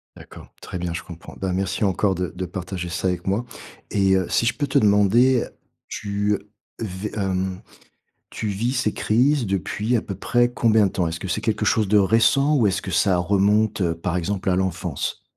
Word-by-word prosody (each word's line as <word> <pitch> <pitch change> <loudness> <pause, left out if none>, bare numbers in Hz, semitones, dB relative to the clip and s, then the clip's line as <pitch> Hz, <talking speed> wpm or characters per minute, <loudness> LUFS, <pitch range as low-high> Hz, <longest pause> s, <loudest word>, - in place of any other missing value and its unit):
D'accord, - - -13
très 90 - -6
bien, 85 -1 -3
je 85 - -5
comprends. 85 -2 -11
Ben 95 -1 -2
merci 95 +3 -1
encore 95 0 +1
de 90 -2 -3
de 90 0 -3
partager 90 -1 -5
ça 90 +2 -2
avec 90 +1 -4
moi 105 +6 0 0.5
et 95 -1 +3
heu, 95 -2 0
si 115 - +1
je 120 - +2
peux 145 - -1
te - - +3
demander, 110 +5 +4 0.4
tu 105 0 -1 0.4
vé 105 -1 -5
hem, 95 -2 -2 0.7
tu 110 - -5
vis 110 +5 -1
ces 125 -5 0
crises 125 +3 +2
depuis 100 +5 -1
à - - -1
peu 100 - -6
près 120 +5 +1
combien 110 -4 +3
de - - -3
temps? 90 -3 0
Est-ce 80 0 -5
que 95 - -5
c'est 85 - -1
quelque 110 -1 -1
chose 110 -1 +2
de 105 +1 +5
récent 115 +8 +3
ou 115 - +3
est-ce 95 - -1
que 95 - -5
ça 90 +2 +2
remonte, 100 -1 +2
par 85 +2 -3
exemple, 95 +2 -1
à 90 - +2
l'enfance? 90 -5 -3
100 Hz, 200 wpm, -22 LUFS, 90-110 Hz, 0.7 s, de